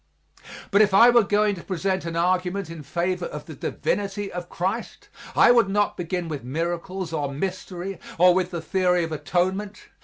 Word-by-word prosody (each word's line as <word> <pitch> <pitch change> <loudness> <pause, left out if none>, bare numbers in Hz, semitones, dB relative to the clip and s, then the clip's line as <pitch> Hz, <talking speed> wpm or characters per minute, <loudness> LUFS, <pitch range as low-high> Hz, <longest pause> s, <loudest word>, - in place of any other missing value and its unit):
But 200 - +5
if 205 -2 +4
I 235 +4 +8
were 240 0 +6
going 205 0 +2
to 175 - -8
present 190 0 -2
an 165 -1 -4
argument 180 +1 0
in 165 -2 -8
favor 175 +5 -2
of 150 0 -8
the 160 - -9
divinity 200 +7 -2
of 175 0 -6
Christ, 190 +7 -4 0.3
I - - +7
would 235 -4 +4
not 205 +1 +1
begin 175 0 -3
with 150 -5 -5
miracles 170 +5 -3
or 145 -3 -2
mystery 185 +3 -4 0.2
or 180 +1 +6
with 180 -1 0
the 170 -3 -4
theory 180 0 +1
of 165 - -4
atonement. 185 +7 -2
180 Hz, 180 wpm, -24 LUFS, 170-195 Hz, 0.3 s, I